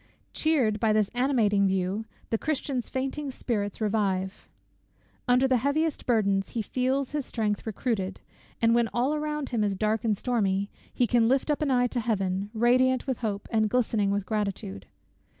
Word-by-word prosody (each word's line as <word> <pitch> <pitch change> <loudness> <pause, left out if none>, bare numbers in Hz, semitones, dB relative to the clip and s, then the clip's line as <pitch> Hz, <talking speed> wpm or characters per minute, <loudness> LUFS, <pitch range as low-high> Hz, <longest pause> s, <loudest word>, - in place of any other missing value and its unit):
Cheered 260 -10 +2
by 220 0 +2
this 215 -2 +2
animating 230 -6 +2
view, 190 +3 -1 0.3
the 225 - +2
Christian's 275 -5 -2
fainting 270 +2 -3
spirits 210 -6 -3
revive. 200 -3 -1 0.8
Under 250 +2 +4
the 260 -1 +3
heaviest 285 +5 0
burdens 200 -5 +2
he 230 - -1
feels 260 +4 -1
his 295 -1 -2
strength 215 -3 -2
recruited; 205 -3 -2 0.4
and 230 0 +4
when 235 -1 +3
all 255 +5 +2
around 300 -1 -2
him 230 -3 0
is 200 -1 0
dark 215 +3 0
and 215 -3 +1
stormy, 200 -5 0 0.2
he 245 - +2
can 235 0 +3
lift 265 +4 +2
up 295 - -1
an 300 - +1
eye 250 -2 +3
to 245 0 -1
Heaven, 200 -4 -1
radiant 255 +3 +3
with 260 -3 -2
hope, 205 -4 -3
and 220 -2 +2
glistening 220 -4 +1
with 200 -1 -1
gratitude. 195 - -3
225 Hz, 170 wpm, -27 LUFS, 205-255 Hz, 0.8 s, Under